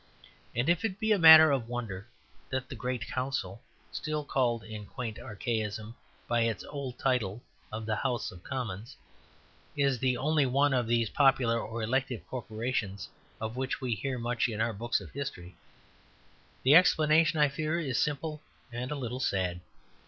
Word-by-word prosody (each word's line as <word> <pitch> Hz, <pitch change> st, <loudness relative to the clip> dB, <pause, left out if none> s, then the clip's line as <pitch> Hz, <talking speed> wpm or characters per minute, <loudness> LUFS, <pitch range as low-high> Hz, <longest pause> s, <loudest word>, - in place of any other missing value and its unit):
And 120 Hz, +4 st, 0 dB
if 175 Hz, +4 st, +2 dB
it 200 Hz, -3 st, -2 dB
be 220 Hz, -1 st, 0 dB
a 205 Hz, -, +4 dB
matter 160 Hz, -2 st, +10 dB
of 125 Hz, -4 st, -1 dB
wonder 110 Hz, -5 st, -5 dB, 0.4 s
that 130 Hz, -1 st, -3 dB
the -, -, -6 dB
great 125 Hz, +2 st, -3 dB
council 120 Hz, -6 st, -3 dB, 0.3 s
(still 155 Hz, -1 st, -3 dB
called 120 Hz, -5 st, 0 dB
in 110 Hz, -2 st, -8 dB
quaint 115 Hz, -4 st, -6 dB
archaism 110 Hz, 0 st, -3 dB, 0.3 s
by 120 Hz, -1 st, +2 dB
its 115 Hz, -2 st, 0 dB
old 140 Hz, -4 st, -6 dB
title 120 Hz, -4 st, 0 dB, 0.3 s
of 110 Hz, +1 st, -5 dB
the 110 Hz, -1 st, -1 dB
House 125 Hz, -3 st, -1 dB
of 90 Hz, -, -13 dB
Commons) 120 Hz, -3 st, -5 dB, 0.8 s
is 140 Hz, -3 st, +2 dB
the 125 Hz, 0 st, +1 dB
only 150 Hz, +1 st, +2 dB
one 140 Hz, +2 st, +3 dB
of 125 Hz, -3 st, +1 dB
these 115 Hz, -1 st, +1 dB
popular 135 Hz, -5 st, +3 dB
or 115 Hz, +1 st, -5 dB
elective 130 Hz, +1 st, -1 dB
corporations 110 Hz, -5 st, -3 dB, 0.3 s
of 110 Hz, +1 st, -4 dB
which 130 Hz, 0 st, -2 dB
we 130 Hz, -3 st, -1 dB
hear 130 Hz, +5 st, -3 dB
much 120 Hz, 0 st, 0 dB
in 110 Hz, -2 st, -4 dB
our 115 Hz, +1 st, +1 dB
books 115 Hz, +4 st, -1 dB
of -, -, -11 dB
history, 95 Hz, -10 st, -6 dB, 1.1 s
the 135 Hz, -, +6 dB
explanation, 160 Hz, -1 st, +5 dB
I 150 Hz, -1 st, +5 dB
fear, 155 Hz, +4 st, -1 dB
is 135 Hz, -7 st, -1 dB
simple 150 Hz, +1 st, -2 dB, 0.3 s
and 120 Hz, +2 st, -4 dB
a 150 Hz, -, -2 dB
little 125 Hz, -2 st, -4 dB
sad. 95 Hz, -9 st, -1 dB
125 Hz, 165 wpm, -30 LUFS, 110-140 Hz, 1.1 s, matter